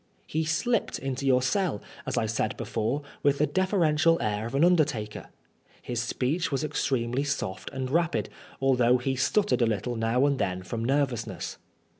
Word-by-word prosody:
He 160 +1 -1
slipped 230 +9 0
into 135 0 -3
your 130 -1 +4
cell, 180 - 0 0.3
as - - -2
I - - +2
said 110 0 -1
before, 115 +5 -2 0.2
with 140 0 +3
the 150 - +3
deferential 165 -3 +2
air 105 0 -1
of 120 - -5
an 145 +5 +5
undertaker. 145 -12 +1 0.5
His 120 -1 -3
speech 145 +8 -1
was 135 +2 0
extremely 130 -3 0
soft, 140 -9 -3
and 130 -1 -3
rapid, 170 +1 +1 0.3
although 125 -2 +4
he 130 +2 -1
stuttered 200 +5 +2
a 120 - +4
little 110 +3 -1
now 115 +4 +2
and 140 -2 +1
then 95 -1 -1
from 115 +4 -4
nervousness. 130 -2 -1
135 Hz, 165 wpm, -27 LUFS, 115-155 Hz, 0.5 s, an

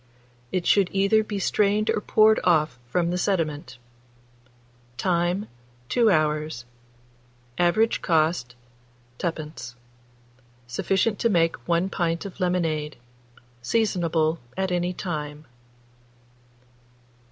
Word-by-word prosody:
It 180 -2 -1
should 195 -3 +4
either 200 +3 +3
be 210 -1 -4
strained 210 +2 +1
or 210 - -1
poured 215 +1 +4
off 155 -7 +2
from 170 +6 0
the 180 - -1
sediment. 155 -9 -1 1.2
Time. 175 - 0 0.4
2 235 -3 +3
hours. 155 - 0 0.9
Average 215 +6 +2
cost, 155 -6 +1 0.6
2d. 150 -7 -5 0.9
Sufficient 195 - 0
to 235 - +2
make 165 -4 +2
1 170 +2 +1
pint 170 -1 -1
of 200 - -9
lemonade. 165 -5 -1 0.6
Seasonable 165 - +1 0.2
at 190 -1 -1
any 175 0 0
time. 150 -4 -5
175 Hz, 95 wpm, -25 LUFS, 155-195 Hz, 1.2 s, should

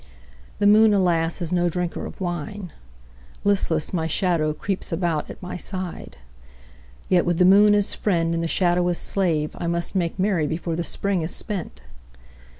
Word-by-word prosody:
The 205 - 0
moon, 210 +1 +6
alas, 175 -2 +1
is 170 +1 -2
no 175 -1 +2
drinker 175 0 -3
of - - -12
wine; 175 +1 -5 0.7
Listless, 190 -6 +1
my 160 -3 -1
shadow 165 -2 +1
creeps 190 +6 -4
about 165 -3 -1
at - - -9
my 180 - -5
side. 185 -1 -5 0.9
Yet 180 -2 +3
with 175 -1 0
the 180 - +4
moon 205 +2 +6
as 205 -1 +1
friend 170 -5 0
and 165 0 -1
the - - 0
shadow 175 0 +1
as 175 -1 0
slave 165 -6 0
I 170 - -3
must 170 0 -2
make 175 -3 -1
merry 185 -5 +1
before 165 +1 -3
the 170 - -2
Spring 190 +3 -1
is 160 - -2
spent. 200 -6 -4
175 Hz, 170 wpm, -23 LUFS, 165-190 Hz, 0.9 s, moon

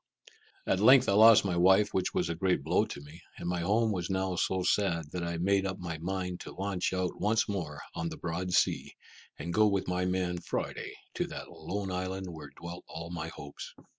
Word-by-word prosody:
At - - +1
length 130 0 +7
I - - +3
lost 110 +1 +8
my 90 -3 0
wife, 95 +4 +4
which 95 - 0
was - - 0
a 85 - -1
great 90 -3 0
blow - - +2
to - - -8
me, 75 +3 -13 0.2
and - - -5
my 90 0 0
home 110 +6 +2
was 90 -3 -2
now 95 -1 0
so 95 +2 0
sad, 85 -5 +1
that 90 - -3
I 85 0 -2
made 95 +3 +2
up 95 0 -4
my 80 -3 -5
mind 90 +1 -3
to - - -9
launch 95 -2 -1
out 95 -1 -2
once 110 +3 +2
more 80 -8 -4
on 85 - -3
the 80 - -7
broad 85 +2 -3
sea, - - +1 0.4
and 85 - -4
go 110 +2 +5
with 100 -2 0
my 90 0 0
man 90 -1 -1
Friday - - -4 0.2
to - - -1
that - - -8
lone 95 +4 -4
isle 95 +1 -2
where 80 -5 -8
dwelt 85 +1 -7
all 85 +1 -7
my 80 -2 -4
hopes. 75 -3 -9
90 Hz, 215 wpm, -30 LUFS, 85-95 Hz, 0.4 s, lost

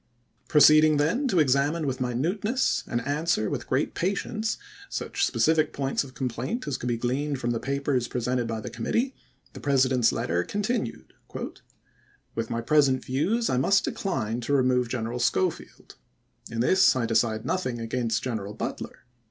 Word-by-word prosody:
Proceeding 155 0 +6
then 175 - +1
to 195 - 0
examine 145 +3 +2
with 130 -2 -2
minuteness, 180 - 0
and 120 - -1
answer 145 -6 0
with - - -4
great 130 +3 0
patience, 210 +4 -2 0.3
such - - -1
specific 155 -1 +2
points 135 0 -1
of 135 -1 -13
complaint 130 - -3
as 140 - -1
could 125 - -5
be 120 -1 0
gleaned 135 +5 -1
from 120 -1 -1
the 115 - -1
papers 135 0 -1
presented 125 0 -1
by 110 -1 -3
the - - -7
committee, 230 - -1 0.4
the - - -9
President's 130 -4 +3
letter 85 +2 -1
continued: 205 - -3 1.2
With 115 -1 -3
my 115 - -2
present 135 0 +3
views, 180 - 0
I 125 - +1
must 195 +10 +3
decline 125 - -2
to 130 +4 -2
remove 125 -3 +2
Gen 120 -2 -2
eral 120 +2 -3
Schofield. 180 +7 -2 0.5
In 115 0 -2
this 190 +7 +5
I 125 -3 0
decide 110 -1 +1
nothing 130 -11 -2
against 115 -1 -1
General 105 -5 -4
Butler. - - -6
130 Hz, 160 wpm, -26 LUFS, 120-155 Hz, 1.2 s, Proceeding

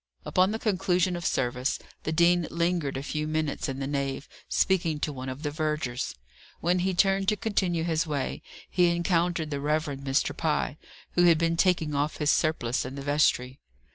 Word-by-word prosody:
Upon 185 +1 +3
the 220 - -1
conclusion 185 -4 +1
of 175 -1 -2
service, 125 +1 0 0.3
the 155 - 0
dean 170 0 +3
lingered 170 -5 0
a 135 - -4
few 150 +1 -3
minutes 155 -1 -1
in 135 - -4
the 135 - -3
nave, 140 0 -2 0.2
speaking 170 -5 +1
to 150 0 -2
one 130 -1 -6
of 130 +4 -7
the 145 - -1
vergers. 150 -5 -2 0.4
When 175 +2 +1
he 185 +1 0
turned 195 +1 +3
to 210 - +3
continue 185 -6 0
his 165 0 0
way, 145 -3 -2 0.3
he 180 -1 +3
encountered 170 -2 +1
the 140 -1 -2
Rev. 155 +2 +1 0.2
Mr. 135 +1 0
Pye, 150 -2 -1 0.3
who 175 - +3
had 170 -2 +6
been 165 +1 +1
taking 165 -4 +2
off 145 +2 -1
his 150 -1 +2
surplice 130 -7 +1
in 130 +2 -6
the 140 - -6
vestry. 135 -3 +1
155 Hz, 185 wpm, -27 LUFS, 140-175 Hz, 0.4 s, had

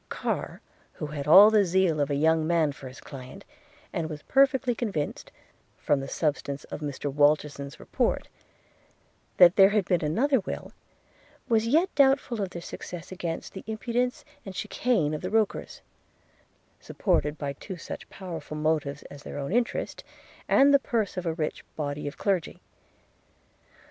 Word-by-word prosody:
Carr, - - -3 0.3
who - - -5
had 145 -1 -5
all 200 +7 +9
the 215 -2 +5
zeal 180 -3 +2
of 145 0 +1
a 145 - 0
young 160 +2 +2
man 165 -3 +2
for 135 -1 -10
his 130 -1 -11
client, 130 -1 -10 0.5
and 160 -2 -2
was 150 -2 -7
perfectly 265 -2 +3
convinced, 200 -11 -3 0.5
from 145 - +1
the 135 - -5
substance 140 -2 -2
of - - -7
Mr 145 -1 -4
Walterson's 145 -1 +1
report, - - -1 1.1
that 175 0 +7
there 195 -1 +8
had 210 -2 +1
been 175 -2 +1
another 255 - +2
will, - - -6 0.8
was 225 -2 +2
yet 320 +9 +2
doubtful 270 -5 +3
of 195 - -2
their 170 -1 -8
success 175 0 -8
against 170 -3 -5
the 190 - -8
impudence 240 +3 -2 0.2
and 190 -1 -8
chicane 210 -7 0
of 155 - -3
the 185 - -3
Rokers; 220 0 -1 1.0
supported 150 +1 0
by 140 -2 -3
two 185 +6 -8
such - - -8
powerful 165 -5 -7
motives, 150 -2 -1
as 145 - -12
their - - -8
own 140 +2 -4
interest, 240 0 -1 0.4
and 280 +1 +5
the 280 - +7
purse 225 -6 -1
of 180 -2 -3
a 165 - 0
rich 155 -2 -3
body 145 -1 -3
of 145 - -6
clergy. 190 -5 -1
170 Hz, 160 wpm, -27 LUFS, 150-215 Hz, 1.1 s, all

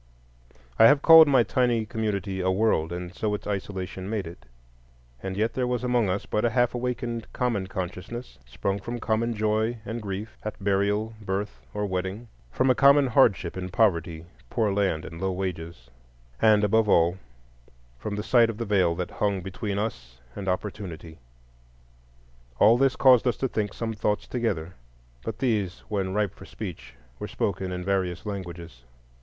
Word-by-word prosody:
I 115 - +9
have 145 0 +4
called 160 -1 +10
my 130 -4 +5
tiny 120 -1 +1
community 100 -3 -2
a 95 - +1
world, 95 -5 +1
and 90 +1 -5
so 105 +1 -1
its - - -8
isolation 95 -1 -4
made 105 -3 -2
it; 85 -5 -11 0.7
and 95 0 -4
yet 110 +2 0
there 125 -1 -1
was 125 0 -1
among 120 -5 +2
us 95 +2 -2
but 105 - -1
a 120 - +3
half 120 0 +2
awakened 120 -2 -3
common 115 -7 -1
consciousness, 95 - -6
sprung 95 +11 -3
from 120 +5 -5
common 115 +1 0
joy 110 +2 0
and 115 +2 -4
grief, 100 +1 -6
at 110 0 -4
burial, 100 +3 0
birth, 100 +1 -3
or 105 0 -2
wedding; 95 +4 -4 0.2
from 130 - +2
a - - +5
common 140 +4 +6
hardship 95 -6 +3
in 90 -1 -4
poverty, 85 -6 +1 0.2
poor 110 -4 +1
land, 95 -6 0
and 80 +2 -9
low 95 0 0
wages; 85 -5 -5 0.5
and, 105 -1 +5
above 110 +1 +3
all, 85 +2 +3 0.8
from 100 - -4
the 105 - -3
sight 115 0 +4
of 110 - -5
the 115 - -3
Veil 95 -5 +2
that 90 0 -4
hung 100 -2 -1
between 100 +2 -4
us 60 - -4 0.2
and 100 -1 -6
Opportunity. 90 -4 -4 1.4
All 110 - +6
this 135 -2 +3
caused 130 -1 +5
us 120 - +1
to 135 - 0
think 105 -4 -2
some 115 -1 -4
thoughts 105 -1 -1
together; 95 -9 -2 0.5
but 115 - -4
these, 105 -8 -1
when 95 -2 -2
ripe 105 -2 0
for - - -13
speech, 70 - -8 0.2
were - - -4
spoken 95 -1 -2
in 90 0 -4
various 95 -1 -1
languages. 85 - -7
105 Hz, 170 wpm, -26 LUFS, 95-115 Hz, 1.4 s, called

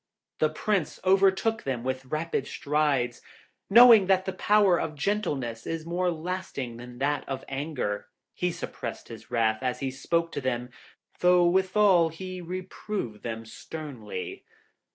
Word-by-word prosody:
The 155 - +3
Prince 185 +2 -1
overtook 195 +3 +3
them 130 -3 -3
with 130 +1 -3
rapid 155 -1 -2
strides, 140 -5 0 0.5
and 195 - -5
knowing 235 -5 +9
that 190 -1 +3
the 190 - -2
power 200 -2 +4
of 155 - -4
gentleness 140 - -2
is 165 -1 -3
more 180 +2 0
lasting 165 -8 -4
than 120 0 -10
that 145 +3 0
of 135 -1 -4
anger, 135 -7 -3 0.3
he 180 0 -1
suppressed 175 - -6
his 115 -1 -10
wrath 110 -1 +1
as 125 -1 -1
he 135 -2 -2
spoke 165 +5 -1
to 145 - -4
them, 125 -1 -2 0.5
though 180 0 +5
withal 185 -1 +4
he 185 +2 -7
reproved 180 - -5
them 115 -1 -5
sternly. 115 - -7
155 Hz, 145 wpm, -27 LUFS, 130-185 Hz, 0.5 s, knowing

